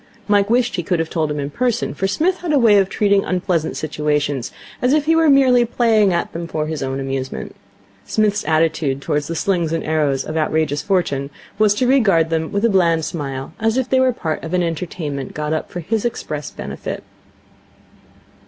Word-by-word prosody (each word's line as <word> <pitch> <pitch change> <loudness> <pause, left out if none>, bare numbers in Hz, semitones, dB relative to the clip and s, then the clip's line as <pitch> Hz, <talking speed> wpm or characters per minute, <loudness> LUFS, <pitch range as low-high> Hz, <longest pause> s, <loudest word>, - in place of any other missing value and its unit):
Mike 205 -1 +3
wished 240 -2 +1
he - - 0
could 175 +1 0
have 165 0 -2
told 160 -3 0
him 150 0 -3
in 140 0 -4
person, 240 +5 -1
for 195 - -1
Psmith 335 - +1
had 350 -3 -4
a 295 - +4
way 220 -5 +5
of 195 -1 +1
treating 200 -2 +2
unpleasant 180 -3 -1
situations 150 -4 -1 0.3
as 250 +2 +3
if 300 -1 +2
he 325 +1 +3
were 325 -1 +4
merely 260 -3 +5
playing 225 -4 +2
at 170 -1 -1
them 170 0 -5
for 155 -2 -2
his 155 -1 -4
own 135 0 -2
amusement. 135 -1 -4 0.5
Psmith's 210 - 0
attitude 155 -3 +1
towards 145 +1 -2
the 165 - -4
slings 175 -3 0
and 165 -1 -1
arrows 150 -4 0
of 155 - -5
outrageous 155 -2 0
Fortune 170 -8 0 0.3
was 210 -1 +4
to 250 - +1
regard 195 -11 +3
them 160 -1 -1
with 200 +3 0
a - - +6
bland 170 -5 +2
smile, 135 -3 -5
as 225 +2 +1
if 260 -1 0
they 260 0 +2
were 260 0 +4
part 160 -9 -4
of 165 +2 -3
an 180 - +2
entertainment 160 -4 -4
got 150 +1 -2
up 155 - -3
for 175 - -5
his 210 +6 -1
express 155 - -4
benefit. - - -6
170 Hz, 200 wpm, -19 LUFS, 155-220 Hz, 0.5 s, a